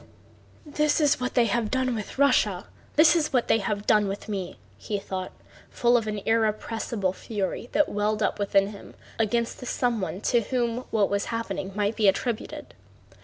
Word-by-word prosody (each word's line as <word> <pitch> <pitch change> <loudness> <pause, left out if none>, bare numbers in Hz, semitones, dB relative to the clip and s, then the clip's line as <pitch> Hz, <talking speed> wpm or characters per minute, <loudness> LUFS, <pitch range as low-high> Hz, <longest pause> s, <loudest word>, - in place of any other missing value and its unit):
"This 300 +1 +1
is 295 -4 +3
what 250 0 -3
they 240 -2 +5
have 225 0 0
done 260 0 0
with 215 +1 -6
Russia! 215 -9 +3 0.3
This 310 +2 +6
is 305 -3 +1
what 250 -3 +1
they 225 - +3
have 205 0 -2
done 210 -2 +4
with 195 +2 -5
me!" 195 -4 -4 0.2
thought 190 -3 -4
he, - - -28 0.2
full 240 0 +2
of 230 -2 +1
an 210 -1 -3
irrepressible 220 -2 0
fury 205 +3 -4
that 300 - +3
welled 210 +1 0
up - - 0
within 200 -1 +2
him 205 -1 -12 0.2
against 230 +1 0
the 250 - -8
someone 230 -8 -1
to 240 +1 +2
whom 240 +1 -2
what 210 -3 +1
was 200 0 0
happening 195 -4 -4
might 205 +1 0
be 215 - +2
attributed. 215 +4 -1
220 Hz, 175 wpm, -26 LUFS, 200-240 Hz, 0.3 s, This